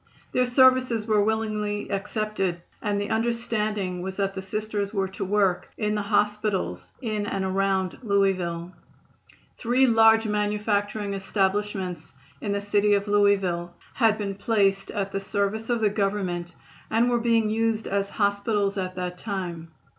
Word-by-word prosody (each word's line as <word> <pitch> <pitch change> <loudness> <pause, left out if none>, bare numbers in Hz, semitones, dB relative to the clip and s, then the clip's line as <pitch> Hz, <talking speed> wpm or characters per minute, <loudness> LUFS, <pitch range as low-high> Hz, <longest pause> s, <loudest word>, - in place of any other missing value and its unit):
Their 250 0 +2
services 255 -3 +4
were 215 -2 +3
willingly 210 -1 -1
accepted, 195 -3 -2 0.2
and 205 -2 0
the 205 - -3
understanding 215 -5 -1
was 190 +1 -5
that 195 -1 0
the 190 - -5
Sisters 205 +1 -3
were 195 -3 -1
to 190 - -5
work 195 -2 +1
in 210 -1 0
the 210 - 0
hospitals 205 - 0
in 215 -3 -2
and 195 -1 -2
around 190 -1 0
Louisville. 185 -5 0 0.9
Three 250 +3 +3
large 225 -2 +5
manufacturing 210 -1 -1
establishments 195 -4 -2 0.3
in 205 - -2
the 200 0 -1
city 205 0 +3
of 200 +1 -1
Louisville 195 -4 +2 0.2
had 225 -4 +3
been 200 -2 -3
placed 195 -1 +1
at 195 -1 -3
the 195 - -2
service 200 +3 -2
of 240 -2 +1
the 215 - +4
Government 190 -4 -2 0.3
and 230 +2 +3
were 240 -1 +2
being 230 -2 +2
used 225 0 0
as 200 0 -1
hospitals 200 0 0
at 185 0 -4
that 180 0 -4
time. 175 -6 -4
205 Hz, 145 wpm, -25 LUFS, 195-215 Hz, 0.9 s, large